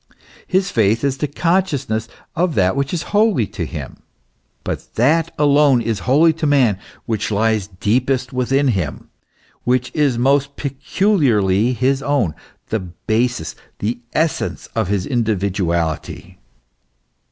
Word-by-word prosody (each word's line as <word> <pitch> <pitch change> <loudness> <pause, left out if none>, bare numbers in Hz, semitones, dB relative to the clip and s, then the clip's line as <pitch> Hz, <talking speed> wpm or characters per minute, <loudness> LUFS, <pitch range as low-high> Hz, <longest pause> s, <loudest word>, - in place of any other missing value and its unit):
His 190 0 +1
faith 110 +1 +2
is 135 -1 0
the 150 - 0
consciousness 145 - 0 0.3
of 170 -2 0
that 95 +1 +2
which 140 0 -1
is 170 -2 -2
holy 205 - +3
to - - -5
him; - - -7 0.7
but - - -5
that 150 +8 +2
alone 145 -3 +4
is 115 -3 -2
holy 160 +5 +5
to 155 - +2
man 125 -9 +3 0.3
which 110 -3 -2
lies 110 -1 +1
deepest 125 +8 0
within 135 +2 +1
him, 95 - -3 0.5
which 125 0 0
is 145 -5 +1
most 140 +3 +2
peculiarly 130 - +1
his 130 +3 +1
own, 135 - 0 0.4
the 110 - 0
basis, 110 +2 -2 0.2
the 115 +4 -2 0.2
essence 160 -1 -1
of 110 -4 0
his 100 -1 -1
individuality. 95 - -2
125 Hz, 130 wpm, -19 LUFS, 105-145 Hz, 0.7 s, holy